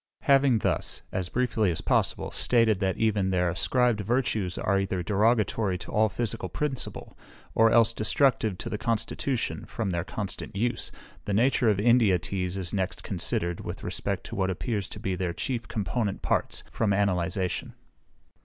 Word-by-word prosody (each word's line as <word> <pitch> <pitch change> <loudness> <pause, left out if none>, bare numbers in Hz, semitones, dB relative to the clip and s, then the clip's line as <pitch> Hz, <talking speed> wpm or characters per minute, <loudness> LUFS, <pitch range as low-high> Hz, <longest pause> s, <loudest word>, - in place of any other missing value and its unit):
Having 135 -3 +4
thus, 90 -5 -1
as 95 -3 -2
briefly 115 -4 +1
as 80 - -2
possible, - - 0
stated 115 -5 +3
that 95 -2 0
even 105 -4 +1
their 90 -1 +2
ascribed 120 +6 +2
virtues 110 -4 0
are 100 0 +1
either 95 -2 -2
derogatory 105 -1 +2
to - - -9
all 110 0 +3
physical 105 -4 -3
principle, 135 - -4 0.4
or 115 0 +5
else 115 0 +4
destructive 110 -3 +2
to - - -6
the 105 - -3
constitution, 115 +2 -1
from 110 -5 -3
their 85 0 -1
constant 100 +1 -5
use, 120 +3 -1 0.3
the 100 - -1
nature 120 +1 +3
of 100 -2 +2
India 115 -4 +4
teas 90 +2 -3
is 90 -3 -3
next 95 -2 -2
considered, 85 0 0
with - - -6
respect - - -3
to - - -7
what 95 -1 0
appears 100 +1 -2
to - - -8
be 95 - -2
their 90 -1 -2
chief 120 +2 -3
component 100 +1 -2
parts, - - 0
from 105 -3 +1
analyzation. 95 -2 -1
105 Hz, 165 wpm, -27 LUFS, 95-115 Hz, 0.4 s, or